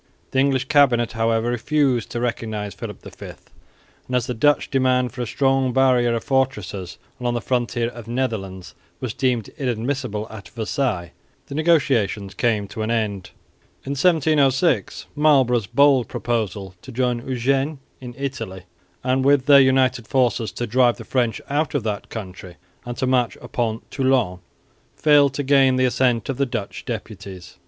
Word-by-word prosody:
The 130 - +1
English 135 -1 +2
cabinet, 130 -5 +3
however, 115 +1 0
refused 130 0 0
to 120 - -4
recognise 110 -4 -3
Philip - - -8
V; - - -10 0.8
and, 125 - -2
as 125 -2 +1
the 125 - -3
Dutch 145 +6 +2
demand 130 -2 +2
for 125 - -6
a 120 - -3
strong 135 +1 +1
barrier 125 -2 +3
of 115 - -3
fortresses 105 -9 -2 0.2
along 120 -1 -1
the - - 0
southern - - -16 0.2
frontier 120 -1 -2
of 120 -2 -10
the 115 - -8
Netherlands 105 -8 -3 0.3
was 125 -4 -4
deemed 125 -4 0
inadmissible 125 -3 -2
at 110 -2 -10
Versailles, 110 -6 -2 0.3
the - - -9
negotiations 135 - +1
came 110 -4 0
to 110 - -6
an 110 - -2
end. 105 -5 -2 0.6
In 135 - -4
1706 150 -1 +2
Marlborough's 130 -7 +3
bold 140 -3 +4
proposal 105 -5 -3
to 130 - -11
join 125 -1 0
Eugene 135 +4 -1 0.2
in 125 -2 -9
Italy, 130 -10 -5 0.4
and 130 +1 +1
with 140 -1 +3
their 140 -1 +8
united 130 -3 +2
forces 125 -4 +1
to 120 - -3
drive 120 +1 +3
the - - -10
French 120 -4 0
out 150 +2 -1
of 140 - 0
that 105 -2 -4
country 95 -4 -8 0.3
and 120 0 -5
to - - 0
march 125 -5 +1
upon 115 -2 -3
Toulon, 130 -9 +1 0.6
failed 145 -3 +4
to 145 - -2
gain 135 -1 +4
the 130 0 +2
assent 125 -3 +1
of 135 - -3
the 140 0 +1
Dutch 115 -5 -5
deputies. 95 -3 -8
125 Hz, 165 wpm, -22 LUFS, 115-135 Hz, 0.8 s, their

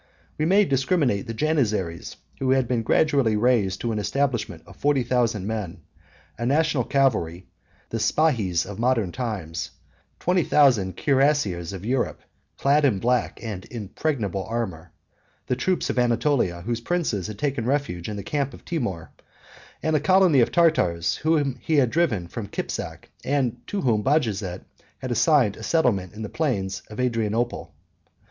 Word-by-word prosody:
We 155 - +2
may 200 +5 +4
discriminate 135 - +1
the 115 - -4
Janizaries, 110 - -1 0.2
who 135 - -1
have 130 -2 +1
been 120 -1 0
gradually 130 -2 +2
raised 105 -5 +2
to 120 - -1
an 110 - -1
establishment 130 +5 -1
of - - -14
forty 145 -3 +1
thousand 120 -5 0
men; 100 -5 -4 0.6
a 120 - -2
national 145 -2 +2
cavalry, 95 -11 +1 0.4
the 115 - -3
Spahis 110 - +1
of 100 +1 -8
modern 115 -6 +1
times; 100 -10 -4 0.5
twenty 180 -1 +2
thousand 120 -13 +3
cuirassiers 135 - +1
of 95 0 -7
Europe, 125 +1 -1 0.4
clad 145 +2 +3
in 130 -8 +3
black 125 +4 0
and 105 -5 -6
impenetrable 110 - -3
armor; 95 -8 -4 0.5
the 125 - 0
troops 180 +8 0
of - - -1
Anatolia, 120 -7 +1
whose 115 +4 -3
princes 135 - -1
had 105 -1 -7
taken 135 -3 -1
refuge 130 -12 -1
in 105 - -4
the 100 - -5
camp 140 +3 -2
of - - -17
Timour, 110 - -3 0.7
and 160 0 +1
a - - +4
colony 185 -2 +4
of 120 - +3
Tartars, 120 - +2
whom 145 -5 0
he 160 - 0
had 130 -5 +3
driven 140 - +1
from 100 +4 -6
Kipzak, - - -5
and 130 -4 0
to 205 - -2
whom 115 -7 +2
Bajazet 110 - 0 0.3
had 130 -1 -5
assigned 120 -2 +3
a - - -10
settlement 110 - +1
in 110 +1 -7
the - - -3
plains 100 -10 -2
of 105 - -9
Adrianople. 115 -1 -1
120 Hz, 155 wpm, -24 LUFS, 100-145 Hz, 0.7 s, may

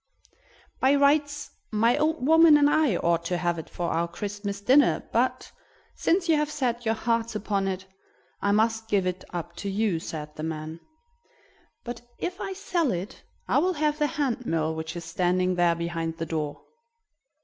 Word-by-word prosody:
"By 270 +2 +4
rights 285 +1 +2 0.2
my 230 +3 +3
old 305 -2 0
woman 320 0 +7
and 290 0 +5
I 295 - +3
ought 170 0 +1
to 180 +1 0
have 175 -1 -1
it 160 - -9
for 175 -1 -3
our 170 +1 0
Christmas 200 +3 -5
dinner, 260 +8 +3
but, - - 0 0.4
since 355 +1 +1
you 320 -2 +4
have 300 0 0
set 245 -5 -2
your 225 - +2
hearts 230 0 -1
upon 200 -2 -1
it, 190 -1 -3 0.6
I 200 - +2
must 220 +2 +2
just - - -31
give 200 -3 +2
it 180 0 -2
up 175 -2 -5
to 200 - -4
you," 195 -3 0
said 150 -2 -7
the - - -7
man. 160 0 -5 1.0
"But, 240 -1 -6 0.2
if 365 +2 -4
I 390 - -3
sell 360 -6 0
it, 190 +7 -5 0.3
I - - +3
will 365 +4 +1
have 300 -1 0
the 300 - +3
hand 270 -5 -1
mill 160 -1 0
which 160 0 -5
is 170 -1 -6
standing 180 +2 +1
there 175 -1 +3
behind 165 -1 -3
the 165 - -3
door." 155 -2 -4
205 Hz, 180 wpm, -26 LUFS, 170-285 Hz, 1.0 s, woman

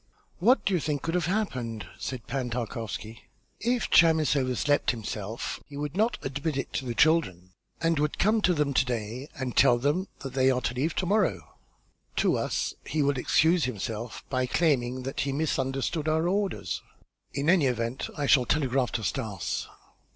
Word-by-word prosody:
"What 245 +9 +4
do 195 - +2
you 180 - +3
think 145 -2 -2
could 165 - -2
have 175 -2 +1
happened?" 125 - -2
said 125 -5 -5
Pan 130 -1 -2
Tarkowski. 115 -2 -5 0.3
"If 240 0 0
Chamis 160 -3 +5
overslept 135 +2 +1
himself, 110 -1 -3
he 140 - -9
would 150 +2 -4
not 220 +4 +2
admit 140 +2 -2
it 135 - -4
to 135 - -2
the 120 -2 -3
children 95 - +2 0.3
and 165 -2 +1
would 150 0 0
come 215 +2 +3
to 180 -3 +3
them 150 -2 +1
to 130 - +4
day 120 +2 -4
and 130 -4 -4
tell 120 - +6
them 150 +10 0
that 135 -2 -6
they 130 0 +3
are 125 -1 +1
to 120 - -1
leave 145 +5 -1
to 185 - 0
morrow. 205 0 0 0.6
To - - +2
us - - -1
he 155 -1 0
will 140 -2 +1
excuse 165 +5 +3
himself 115 -1 -4
by 130 -1 0
claiming 130 -4 +1
that 135 +1 -4
he 140 - 0
misunderstood 135 +1 -1
our 160 +2 +2
orders. 180 - -1 0.5
In 140 +2 -1
any 170 -5 +5
event, 120 +1 -2
I 145 - 0
shall 130 -2 +5
telegraph 135 -2 +1
to 115 - -2
Stas." 105 -7 -2
135 Hz, 180 wpm, -28 LUFS, 125-160 Hz, 0.6 s, tell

